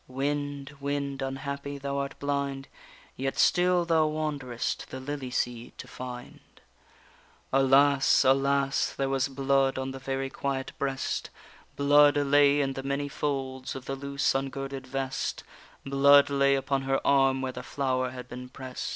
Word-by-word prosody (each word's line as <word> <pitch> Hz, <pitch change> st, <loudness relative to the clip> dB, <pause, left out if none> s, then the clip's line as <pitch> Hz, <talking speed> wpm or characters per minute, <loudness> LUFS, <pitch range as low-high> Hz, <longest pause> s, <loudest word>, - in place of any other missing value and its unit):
Wind, 145 Hz, +1 st, -3 dB
wind, 140 Hz, -1 st, -3 dB
unhappy! 140 Hz, +1 st, -4 dB
thou 140 Hz, 0 st, -3 dB
art 140 Hz, 0 st, -4 dB
blind, 140 Hz, -1 st, -2 dB, 0.5 s
Yet 135 Hz, +1 st, -3 dB
still 180 Hz, 0 st, +3 dB
thou 160 Hz, -2 st, +3 dB
wanderest 145 Hz, -6 st, -3 dB
the 130 Hz, -, -6 dB
lily 135 Hz, -1 st, -5 dB
seed 120 Hz, -1 st, -3 dB
to -, -, -9 dB
find._ 125 Hz, -1 st, -8 dB, 1.1 s
Alas! 135 Hz, +1 st, +4 dB
alas! 135 Hz, +1 st, +2 dB
there 135 Hz, 0 st, -1 dB
was 135 Hz, 0 st, +1 dB
blood 135 Hz, 0 st, +1 dB
on 130 Hz, 0 st, -3 dB
the 135 Hz, -, -7 dB
very 135 Hz, 0 st, -3 dB
quiet 135 Hz, -1 st, -3 dB
breast, 135 Hz, -1 st, -2 dB, 0.5 s
Blood 145 Hz, +1 st, +5 dB
lay 145 Hz, 0 st, +4 dB
in 135 Hz, -1 st, -1 dB
the 135 Hz, -, -5 dB
many 140 Hz, +1 st, -2 dB
folds 135 Hz, -3 st, -3 dB
of 130 Hz, -1 st, -7 dB
the 135 Hz, -, -3 dB
loose 140 Hz, +1 st, -1 dB
ungirded 135 Hz, 0 st, -4 dB
vest, 135 Hz, 0 st, -3 dB, 0.4 s
Blood 140 Hz, +1 st, +5 dB
lay 140 Hz, 0 st, +3 dB
upon 135 Hz, 0 st, -1 dB
her 135 Hz, 0 st, 0 dB
arm 135 Hz, -1 st, +3 dB
where 130 Hz, -, -2 dB
the -, -, -7 dB
flower 130 Hz, -2 st, -1 dB
had 125 Hz, -1 st, -9 dB
been 125 Hz, 0 st, -8 dB
prest. 130 Hz, 0 st, -6 dB
135 Hz, 150 wpm, -28 LUFS, 135-140 Hz, 1.1 s, Blood